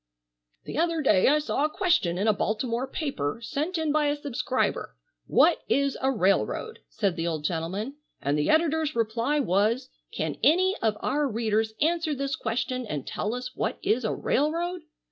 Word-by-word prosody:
"The - - -4
other 330 -2 +1
day 200 -8 +4
I 295 - +5
saw 295 -1 -1
a 305 - +2
question 305 - +1
in 200 +4 0
a 215 - +5
Baltimore 230 +5 -1
paper, 245 - -3
sent 310 +9 -2
in 315 -2 0
by 300 0 +2
a 290 - +1
subscriber, 270 -3 -2 0.3
'What - - +4
is 280 -1 +2
a 265 - +2
railroad?'" 225 - 0
said 195 -5 -1
the 165 0 -2
old 160 -3 -2
gentleman, 185 - -3 0.2
"and 140 +1 0
the 150 0 0
editor's 315 -1 +2
reply 230 +6 0
was, 230 +3 +1 0.2
'Can - - -3
any 370 +5 +4
of 215 -2 +1
our 295 0 +1
readers 220 -2 0
answer 325 -1 +1
this 275 0 -2
question 255 +3 -2
and 145 -7 -4
tell 215 +3 -2
us 250 +1 -6
what - - -2
is 240 +3 +1
a 220 - 0
railroad? 335 +5 0
255 Hz, 175 wpm, -27 LUFS, 215-300 Hz, 0.3 s, I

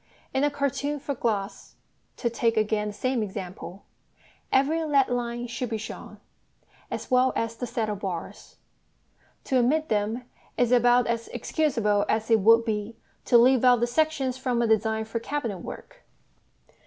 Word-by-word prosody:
In 265 - +1
a 290 - +4
cartoon 285 +1 -2
for 280 +1 -3
glass 210 -6 -3 0.4
(to 240 - -1
take 230 -1 0
again 215 -1 +1
the 210 - -5
same 255 +2 -1
example) 190 -2 -7 0.7
every 300 +5 +2
lead 280 -4 +2
line 240 -1 -2
should 245 0 -4
be 225 - -2
shown, 220 +1 -9 0.7
as - - -6
well 255 +1 +4
as 230 0 -2
the 245 +1 -5
saddle 220 -3 -2
bars; 185 -4 -6 0.9
to 260 - +1
omit 305 +6 +1
them 215 +3 -1 0.3
is 245 -1 +2
about 245 0 +5
as 230 -1 -2
excusable 230 -6 0
as 220 +1 0
it 225 - +6
would 230 +3 +5
be 215 0 -3 0.3
to 240 - +5
leave 255 +1 +5
out 250 -1 +6
the 240 - +2
sections 270 -1 0
from 250 -2 -1
a 235 - +2
design 220 0 +1
for 225 +1 -3
cabinet 235 -6 -3
work. - - -10
235 Hz, 160 wpm, -26 LUFS, 220-260 Hz, 0.9 s, it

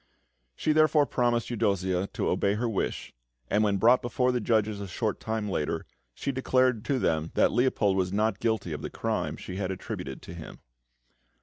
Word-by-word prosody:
She 155 - 0
therefore 155 -1 +4
promised 120 -3 0
Eudossia 95 -4 0
to - - -1
obey 100 +1 +1
her 120 +3 -1
wish; 110 -4 -3 0.4
and 105 +1 +3
when 100 -2 +2
brought 120 +5 +5
before 125 +1 +1
the 125 - 0
judges 110 -2 +1
a 100 - -5
short 105 +3 -2
time 110 -1 -2
later, 75 -7 -2 0.3
she 140 - -2
declared 130 -3 +2
to 140 - +1
them 80 -8 0
that - - +4
Leopold 115 -5 +2
was 90 -1 0
not 110 +3 +1
guilty 110 -7 -1
of 75 - -5
the - - -4
crime - - -2
she 90 - -7
had 95 -2 -2
attributed 95 - -6
to 85 - -9
him. 85 -3 -9
110 Hz, 185 wpm, -28 LUFS, 95-120 Hz, 0.4 s, brought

